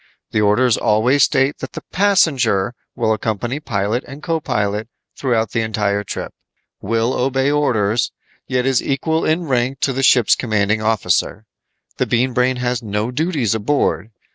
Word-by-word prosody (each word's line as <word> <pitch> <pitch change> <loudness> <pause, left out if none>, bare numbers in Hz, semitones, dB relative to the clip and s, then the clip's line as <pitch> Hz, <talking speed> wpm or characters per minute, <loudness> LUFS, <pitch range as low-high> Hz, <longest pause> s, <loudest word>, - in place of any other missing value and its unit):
The 105 - +1
orders 110 +3 +3
always 120 +7 +2
state 135 +2 +2
that - - -7
the - - -7
'passenger' 135 - +2 0.2
will 110 -2 +1
accompany 110 +5 -2
pilot 110 -2 -2
and 140 +3 -10
co 165 -1 0
pilot 105 -5 -2 0.3
throughout 115 -5 0
the 115 - 0
entire 105 -2 -1
trip, - - -6 0.5
will 115 +4 0
obey 135 +2 +1
orders, 120 -7 +1 0.4
yet 125 -1 0
is 135 -2 +2
equal 160 +4 -1
in 160 +3 +1
rank 130 -2 -1
to 135 - +1
the 135 - -2
ship's 125 -4 +5
commanding 110 -2 0
officer. 110 -1 0 0.5
The - - 0
Bean 125 +2 +1
Brain 125 +1 +2
has 125 -1 -2
no 105 +1 -2
duties 145 - 0
aboard. 110 - 0
120 Hz, 155 wpm, -19 LUFS, 110-135 Hz, 0.5 s, ship's